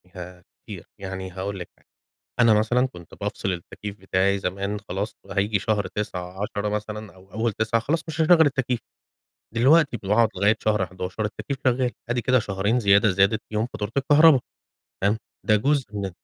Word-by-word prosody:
ياه! 90 0 -9 0.2
كتير، - - -9 0.2
يعني 95 -1 -5
هاقول 95 +1 -5
لِك 85 - -7
حاجة، - - -31 0.5
أنا 115 -2 +6
مثلًا 125 +4 +2
كُنت 90 -8 -14
بافصل 100 -1 -2
التكييف 100 +3 -7
بتاعي 95 +1 +1
زمان 100 +3 -3
خلاص، 100 +4 -3 0.2
هييجي 100 0 +1
شهر 105 0 0
9 95 -2 -5
10 105 0 -2
مثلًا 105 -1 -5
أو 95 +1 -19
أول 115 +1 0
9 110 +2 0
خلاص 160 +6 0
مش 160 +1 -2
هاشغل 160 0 +6
التكييف، 130 -4 0 0.8
دلوقتي 140 +1 +4
ب - - -19
باقعد 110 +1 +4
لغاية 100 +4 +3
شهر 105 -3 +2
11 90 +4 -4
التكييف 135 +5 -5
شغال 125 0 +2 0.2
أدي 120 0 0
كده 130 +1 +3
شهرين 100 +4 0
زيادة 100 0 +5
زادت 100 +4 +2
فيهم 110 +2 -1
فاتورة 105 +1 -4
الكهرباء 145 0 +6 0.6
تمام، 105 +3 +2 0.3
ده 105 - +5
جزء 140 +4 +1
من 100 -1 -3
105 Hz, 170 wpm, -24 LUFS, 95-120 Hz, 0.8 s, أنا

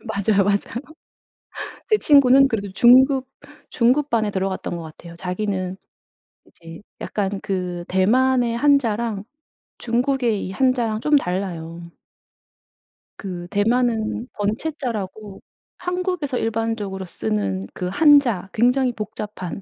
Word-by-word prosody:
맞아요, 200 -2 +1
맞아요. 200 +1 +3 1.3
제 430 - +5
친구는 275 -2 +6
그래도 200 -5 -3
중급 260 +3 +5 0.4
중급반에 235 -3 +2
들어갔던 190 -2 -3
것 170 - -7
같아요, 170 +2 -12
자기는. 185 0 -3 0.7
이제 165 +2 -13 0.2
약간 200 -1 -3
그 180 -2 -3
대만의 240 +5 +2
한자랑 235 -6 +1 0.6
중국의 240 -2 0
이 - - -6
한자랑 235 -2 +1
좀 300 +3 +3
달라요. 170 - -4 1.3
그 175 -3 -6
대만은 225 +1 0
번체자라고 215 -3 -4 0.4
한국에서 360 -7 -2
일반적으로 225 -4 -2
쓰는 105 - -2
그 180 - -4
한자 245 - +4
굉장히 250 +2 +2
복잡한 210 -4 -6
215 Hz, 250 characters per minute, -22 LUFS, 190-255 Hz, 1.3 s, 친구는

